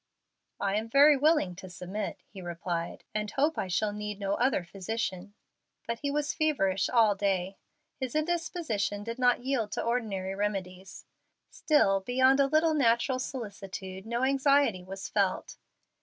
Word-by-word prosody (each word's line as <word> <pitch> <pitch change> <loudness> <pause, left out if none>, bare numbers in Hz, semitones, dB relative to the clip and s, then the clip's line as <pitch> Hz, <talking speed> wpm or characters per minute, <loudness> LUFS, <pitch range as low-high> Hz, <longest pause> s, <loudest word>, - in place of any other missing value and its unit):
"I 200 0 0
am 220 +1 -3
very 285 +4 +7
willing 285 - +2
to 190 -1 -9
submit," 185 +4 -5
he 195 - -8
replied, 170 -1 -4
"and 210 0 -2
hope 295 +7 +1
I - - -2
shall 205 +4 0
need 210 -1 -5
no 200 -1 -1
other 245 -4 +1
physician." 195 +1 -4 0.5
But 230 0 -3
he 285 - -2
was 295 +1 -1
feverish 195 - +1
all 225 -4 +4
day. 195 -1 -1 0.4
His 260 -1 -4
indisposition 310 - -1
did 230 +3 -6
not 245 -1 +3
yield 245 -6 0
to - - -2
ordinary 210 -6 -2
remedies. 190 -2 -4 0.5
Still, 195 -11 +3
beyond 260 +6 +3
a 275 - +5
little 310 +3 +3
natural 255 -2 +2
solicitude, 195 -6 -6
no 235 +2 -1
anxiety 275 -7 +3
was 190 +1 -7
felt. 200 -3 -1
215 Hz, 150 wpm, -29 LUFS, 195-270 Hz, 0.5 s, very